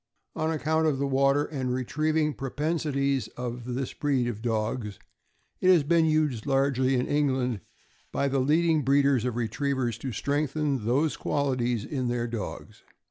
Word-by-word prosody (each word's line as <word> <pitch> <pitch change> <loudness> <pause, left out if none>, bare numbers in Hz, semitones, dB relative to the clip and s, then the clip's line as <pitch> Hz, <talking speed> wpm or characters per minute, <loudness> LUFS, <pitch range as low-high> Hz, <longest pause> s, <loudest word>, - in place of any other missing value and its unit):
On 155 - 0
account 160 0 +1
of 145 -3 +1
the 140 - 0
water 140 +1 +2
and 130 -5 -3
retrieving 155 +4 0
propensities 140 -1 -1
of 125 0 -4
this 130 0 -3
breed 135 -4 0
of 110 -3 -4
dogs, 110 -2 -2 0.6
it 185 - +3
has 175 -5 +6
been 165 +2 +3
used 150 -7 +1
largely, 135 -1 +2
in 125 - +1
England, 130 -6 0 0.5
by 140 - 0
the 135 0 +1
leading 155 +3 +3
breeders 140 -2 +3
of 125 -2 -1
retrievers 120 0 -1
to 130 +1 -4
strengthen 140 0 -1
those 140 +6 +1
qual 140 -2 0
ities 120 -3 -1
in 130 -4 -2
their 120 -1 -1
dogs. 115 -4 -6
135 Hz, 155 wpm, -27 LUFS, 125-150 Hz, 0.6 s, has